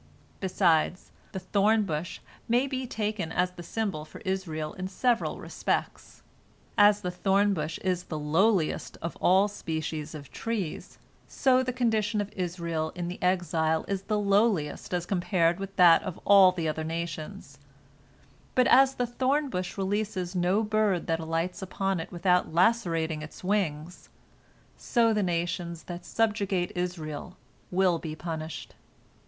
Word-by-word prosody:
Besides, 180 -2 +1 0.2
the - - -5
thorn 205 +3 +2
bush 165 -2 -4 0.3
may 245 +3 +3
be 260 -2 -3
taken 210 -7 -3
as 180 +2 +1
the 180 - -10
symbol 195 -4 -3
for 155 - -12
Israel 180 -6 -3
in 185 0 -5
several 235 +4 0
respects. - - -3 0.5
As 205 0 +5
the 180 - -2
thorn 195 +3 +2
bush 155 -2 -3
is 180 -1 -1
the 155 - -5
lowliest 165 +4 +1
of 170 - -4
all 190 +3 +4
species 160 -5 -4
of 145 -2 -10
trees, 220 -8 -4 0.3
so 260 -2 +3
the 255 0 -1
condition 220 -4 0
of 205 0 -3
Israel 170 -3 -2
in 175 -1 -3
the 180 - -7
exile 165 -3 +1
is 195 -1 -2
the 210 +2 -1
lowliest 200 -6 +1
as 175 -1 -1
compared 175 -2 +1
with 195 0 -6
that 175 -3 +7
of 185 -4 -6
all 195 -2 +8
the 170 -3 -3
other 155 +1 -2
nations, 165 -1 -5 1.0
but 255 - +5
as 270 +1 +5
the 245 - 0
thorn 265 +4 0
bush 180 +1 -4
releases 195 -2 -2
no 180 +4 +2
bird 210 -4 +1
that 165 0 0
alights 165 +3 -2
upon 195 0 -1
it 165 - -6
without 180 0 +1
lacerating 165 -4 +1
its 155 +3 -10
wings, 180 -4 -2 0.7
so 230 -2 +2
the 210 - +1
nations 170 -1 -2
that 175 0 -7
subjugate 205 -5 0
Israel 175 -1 -4 0.3
will 180 -2 +2
be 155 -1 -6
punished. 160 -1 -6
180 Hz, 150 wpm, -28 LUFS, 165-205 Hz, 1.0 s, all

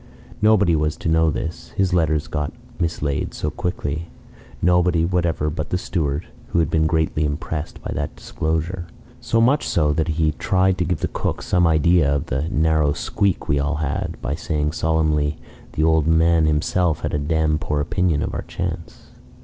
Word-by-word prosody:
Nobody 105 -5 +4
was 75 0 0
to - - -2
know 80 0 +4
this 80 +2 -5
(his 95 -2 +2
letters 80 -3 +2
got 75 -2 -3 0.3
mislaid 75 -4 -1
so 75 - -2
quickly) 85 -2 -3 0.5
nobody 90 -1 +3
whatever 85 -4 0
but 75 +1 -4
the 90 - 0
steward, 75 -5 -2 0.2
who - - -2
had 80 -1 +2
been 80 -1 +3
greatly 80 -1 +1
impressed 75 +1 -3
by - - -4
that - - -3
disclosure. 80 +3 -3 0.3
So 115 - 0
much 130 +6 +3
so, 75 -3 +2
that 80 +1 0
he 80 -1 +1
tried 95 +4 +1
to 90 - +1
give 85 -2 -2
the - - +1
cook - - -3
some 90 -2 +3
idea 80 -1 +3
of 70 -1 0
the 70 +6 -2
"narrow 80 -4 +2
squeak 100 +4 -1
we 70 - +2
all 75 +1 0
had" 80 +3 -2
by 70 - -1
saying 75 -2 -1
solemnly, 75 -2 +1 0.4
"The 80 - 0
old 80 -1 +3
man 80 0 +4
himself 80 +2 +1
had - - -3
a 75 - +1
dam' 75 +1 +1
poor 75 -2 -1
opinion 80 0 +1
of - - -3
our - - -2
chance." 85 -1 -6
80 Hz, 180 wpm, -22 LUFS, 75-85 Hz, 0.5 s, Nobody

